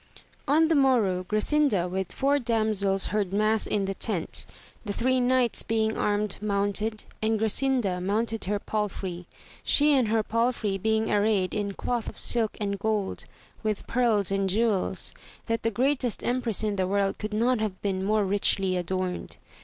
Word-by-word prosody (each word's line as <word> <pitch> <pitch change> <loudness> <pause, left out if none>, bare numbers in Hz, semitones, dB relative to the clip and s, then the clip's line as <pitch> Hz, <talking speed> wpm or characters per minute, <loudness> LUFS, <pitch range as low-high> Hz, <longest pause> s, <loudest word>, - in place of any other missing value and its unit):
N 310 +4 +4
the 325 - +2
morrow 240 -11 +3
Grasinda 215 - +2
with 185 0 -3
four 280 +1 +1
damsels 215 -5 0
heard 205 -3 0
mass 215 +2 +2
in 200 -2 0
the 195 - -2
tent, 195 -4 -3 0.4
the 205 - -3
three 255 +4 +1
knights 250 -1 +2
being 220 0 0
armed 210 -1 0
mounted, 210 +1 -1 0.2
and 220 0 +1
Grasinda 220 -4 +1
mount 220 +4 0
ed 225 - -4
her 205 +2 0
palfrey, 195 -4 -4 0.3
she 295 +1 +4
and 260 -5 +3
her 220 0 +1
palfrey 230 -3 0
being 220 +2 0
arrayed 205 -3 +2
in 205 -2 -2
<5loth 240 +2 -2
of - - -13
silk 230 -3 0
and 200 -2 -2
gold, 210 -1 -2 0.4
with 215 -2 -2
pearls 225 -6 +1
and 195 -1 0
jewels, 210 -1 +1 0.3
that 230 0 -1
the 225 - +1
greatest 250 0 0
empress 240 -4 0
in 210 -2 -1
the 185 -1 +1
world 195 0 0
could 215 0 -4
not 235 +3 +1
have 210 -4 -3
been 190 -2 -1
more 210 +1 +2
richly 195 -1 +2
adorned. 180 +1 -3
215 Hz, 165 wpm, -27 LUFS, 195-230 Hz, 0.4 s, N